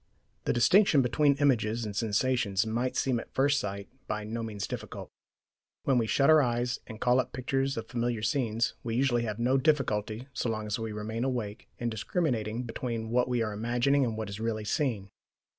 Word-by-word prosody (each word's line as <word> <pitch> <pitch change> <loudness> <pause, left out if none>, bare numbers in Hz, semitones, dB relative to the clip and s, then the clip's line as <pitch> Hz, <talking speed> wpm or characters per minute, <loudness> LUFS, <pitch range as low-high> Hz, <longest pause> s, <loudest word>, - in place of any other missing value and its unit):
The - - +2
distinction 150 - +5
between 140 +3 +3
images 120 -5 +1
and 105 -2 -5
sensations 110 -1 +1
might 120 +3 -1
seem 130 -3 +1
at - - -11
first 140 +1 +3
sight 100 0 -4 0.2
by 105 0 -2
no 115 +2 -4
means 105 -3 -4
difficult. - - -7 0.7
When 130 -3 +3
we 115 - 0
shut 140 +5 +3
our 155 -1 +7
eyes 120 -1 0
and 110 -2 -9
call 125 +2 +3
up 130 0 -2
pictures 135 +1 -1
of 115 0 -4
familiar 120 -2 -2
scenes, 115 -1 0
we 115 -1 -2
usually 120 -2 +2
have 105 -2 -3
no 125 +3 +2
difficulty, 125 -5 0
so 125 - -1
long 110 -1 -2
as 105 +1 -2
we 115 -1 -3
remain 110 +2 -3
awake, 120 -5 -3
in 120 -1 -2
discriminating 115 - -1
between 115 -1 -4
what 125 +1 +2
we 120 -2 +1
are 105 -1 -3
imagining 120 +6 +2
and 115 -3 -1
what 110 -1 -3
is 100 +1 -6
really 110 -1 -2
seen. 105 -7 -1
120 Hz, 195 wpm, -29 LUFS, 110-130 Hz, 0.7 s, our